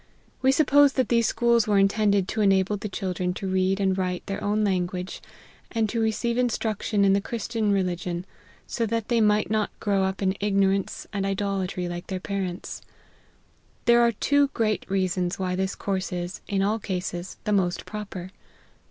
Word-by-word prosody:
We 265 - +5
suppose 285 -1 +5
that 260 - 0
these 235 -2 +3
schools 235 -1 +2
were 205 -1 +3
intended 200 -1 +3
to 220 - -1
enable 195 0 +3
the 205 +1 -5
children 185 -2 -2
to 195 - -4
read 190 +1 +1
and 190 -1 +2
write 180 -1 -2
their 195 - -4
own 210 +1 +1
language, 180 -2 -2 0.5
and 225 -2 +1
to 230 +2 -1
receive 235 +2 0
in 250 -1 +3
struction 215 -2 0
in 195 - +5
the 200 - +2
Christian 225 -1 -2
religion, 180 -2 -1 0.4
so 230 -1 -2
that 230 0 -2
they 235 -2 +3
might 210 -1 +2
not 215 -1 +1
grow 200 -2 +1
up 190 +1 -2
in 190 0 +2
ignorance 195 -1 +1
and 200 -2 -1
idolatry 195 -2 -2
like 175 0 -6
their 190 -1 -3
parents. 185 -2 -4 1.0
There 235 0 +6
are 235 0 +4
two 285 +6 +3
great 215 -4 0
reasons 185 -2 0
why 185 -1 -1
this 190 +1 -1
course 195 -1 -2
is, 175 0 -4
in 195 -2 0
all 215 +3 +1
cases, 180 -2 -4
the 210 - 0
most 180 -3 0
proper. 195 -4 -7
200 Hz, 180 wpm, -25 LUFS, 185-220 Hz, 1.0 s, There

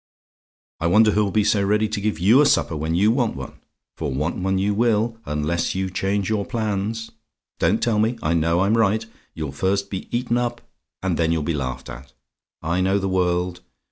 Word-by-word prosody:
"I 85 - 0
wonder 105 +5 +5
who'll 105 0 +1
be 105 +2 +2
so 105 -1 +2
ready 105 +2 +2
to 105 -1 -3
give 105 +1 -1
you 110 +10 +5
a - - +5
supper 80 - +2
when 80 +2 -2
you 105 +5 +4
want 120 -1 0
one: 65 -1 -8 0.4
for 75 -3 -3
want 75 +6 -1
one 95 +1 0
you 100 +2 +1
will, 115 +1 +1
unless 75 +5 -1
you 95 0 -2
change 95 +1 -1
your 110 -2 0
plans. 110 +1 -3 0.5
Don't 110 - +2
tell 110 -3 +2
me! 115 +3 +1
I 75 - +1
know 85 +1 +2
I'm 100 +3 +3
right. 110 +1 +2 0.3
You'll 75 -4 -4
first 100 +6 -1
be 95 - -5
eaten 120 0 0
up, 120 0 -2 0.4
and 90 -4 0
then 80 -1 +2
you'll 80 -2 0
be 85 - -1
laughed 65 -3 -4
at. 65 0 -10 0.5
I 85 +3 0
know 95 +2 +2
the 95 -1 -1
world. 90 -1 0
95 Hz, 205 wpm, -22 LUFS, 85-110 Hz, 0.5 s, wonder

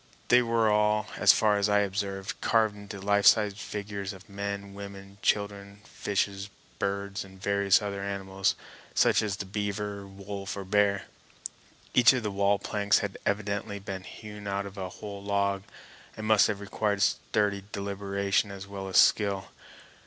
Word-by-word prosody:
They 125 0 +7
were 115 -2 +2
all, 105 0 +3
as - - +7
far 105 -1 +3
as 100 +1 +2
I 105 0 +4
observed, 100 -1 -3
carved 110 -2 +2
into 100 -1 -9
life 100 +1 +3
size 105 -2 +6
figures 100 -1 -5
of 95 +3 -14
men, 100 0 -5
women, 100 0 -8
and 100 0 -18
children, 100 0 -1
fishes, 100 -1 -2 0.3
birds, 100 0 -2
and 95 -1 -14
various 100 +1 +3
other 100 -1 -3
animals, 95 -1 -1 0.4
such - - +4
as 105 -3 -1
the 100 - -4
beaver, 100 0 -3
wolf, 100 0 -6
or 100 - -4
bear. 100 0 +2 0.9
Each 125 0 +7
of 125 -3 -1
the 105 - -2
wall 100 +1 +2
planks 100 0 +1
had 100 - -7
evidently 100 0 -1
been 95 -1 -6
hewn 105 0 -9
out 100 0 -1
of 100 0 -9
a 95 -2 -4
whole 100 0 -8
log, 100 -1 0 0.6
and 110 - -5
must 110 -1 +5
have 105 -2 -3
required 100 0 0
sturdy 100 -2 +1
deliberation 100 +1 -1
as 100 -1 -7
well 100 -1 -6
as 95 - 0
skill. 100 -2 +4
100 Hz, 165 wpm, -28 LUFS, 100-105 Hz, 0.9 s, They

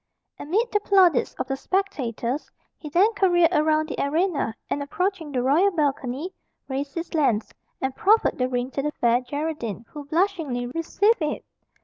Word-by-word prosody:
Amid 430 +11 0
the 415 - +2
plaudits 375 -9 +3
of - - -3
the 270 - -1
spectators, 270 - -2 0.3
he 305 - -9
then 390 +9 +3
careered 350 -4 +3
around 310 0 +2
the 305 - -2
arena, 305 - 0
and 285 - -2
approaching 340 +2 -2
the 250 -3 -1
royal 310 +10 +4
balcony, 290 0 -2 0.3
raised 275 +1 -4
his 335 +1 -5
lance, 245 -9 +1 0.3
and 265 0 -2
proffered 435 -5 +3
the 255 0 +1
ring 250 +1 -2
to 275 - -2
the 300 +1 -2
Fair 240 +1 +2
Geraldine, 255 -5 -4
who 295 -1 -9
blushingly 315 -6 0
received 335 - +1
it. 300 -1 -2
300 Hz, 160 wpm, -24 LUFS, 265-360 Hz, 0.3 s, royal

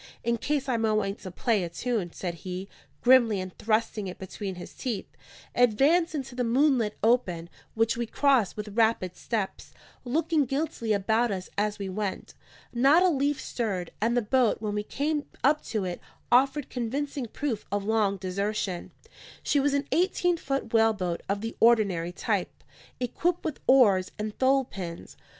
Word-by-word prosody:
"In 235 0 +1
case 280 +4 -1
I 250 -3 +1
might 225 -1 +1
want 200 -2 -1
to 185 - -7
play 205 +2 0
a 170 - -3
tune," 205 -1 -2
said 175 0 -4
he, 185 +1 -5 0.4
grimly, 240 -5 +5
and 185 -1 -6
thrusting 215 -2 0
it 180 - -7
between 190 0 -6
his 175 - -9
teeth, 235 -7 -3 0.5
advanced 285 +9 +3
into 270 -3 -4
the 250 0 -1
moonlit 245 -3 +2
open; 185 -8 +1 0.2
which 225 0 +2
we 235 -1 -2
crossed 260 -7 +2
with 210 0 -5
rapid 220 -6 +2
steps, 215 -5 -4 0.3
looking 300 +3 +1
guiltily 270 -4 -2
about 220 +4 +2
us 190 -3 -4
as 210 0 0
we 200 -2 -4
went. 195 0 -4 0.4
Not 275 +8 +5
a 370 - +5
leaf 285 -2 +1
stirred; 195 -7 -3
and 235 +3 +2
the 240 - +2
boat, 245 +1 +2
when 210 -1 -3
we 210 - 0
came 290 +7 -2 0.2
up 295 +3 +3
to 215 -4 -2
it, 180 -1 -4 0.3
offered 270 +3 +3
convincing 265 +2 -3
proof 235 -2 -3
of 205 0 -1
long 210 -2 +2
desertion. 195 0 -2 0.5
She 290 - +2
was 280 +1 +2
an 280 0 -1
eighteen 355 0 +2
foot 275 -6 -3
whaleboat 210 -6 +2
of 200 0 0
the 225 +1 -5
ordinary 200 -8 +3
type, 180 - -2 0.4
equipped 330 +8 -1
with 310 - -3
oars 205 -9 +5
and 215 0 -4
thole 270 0 +3
pins. 175 -6 -8
225 Hz, 170 wpm, -27 LUFS, 200-270 Hz, 0.5 s, grimly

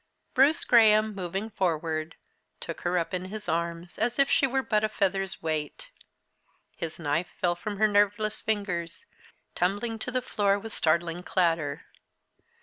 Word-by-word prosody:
Bruce 285 +6 +4
Graham, 215 -2 +5
moving 195 +3 -4
forward, 165 -5 -1 0.4
took 165 - -7
her 180 +1 0
up 170 +2 -2
in 185 0 -2
his 210 +1 -6
arms, 170 +1 -2
as 235 +2 0
if 275 -1 +3
she 270 - +4
were 265 +1 0
but 215 -3 +1
a 215 - +2
feather's 195 -2 -1
weight. 155 -2 -3 0.8
His 165 -1 -5
knife 160 +2 -1
fell 175 -1 +2
from 205 +4 -5
her 215 +1 +4
nerveless 205 +1 +1
fingers, 185 -6 -3 0.5
tumbling 205 +5 -1
to 250 - -4
the 250 0 -1
floor 200 -4 +1
with 220 +2 -8
startling 165 +2 +1
clatter. 165 -6 0
195 Hz, 150 wpm, -27 LUFS, 170-215 Hz, 0.8 s, Graham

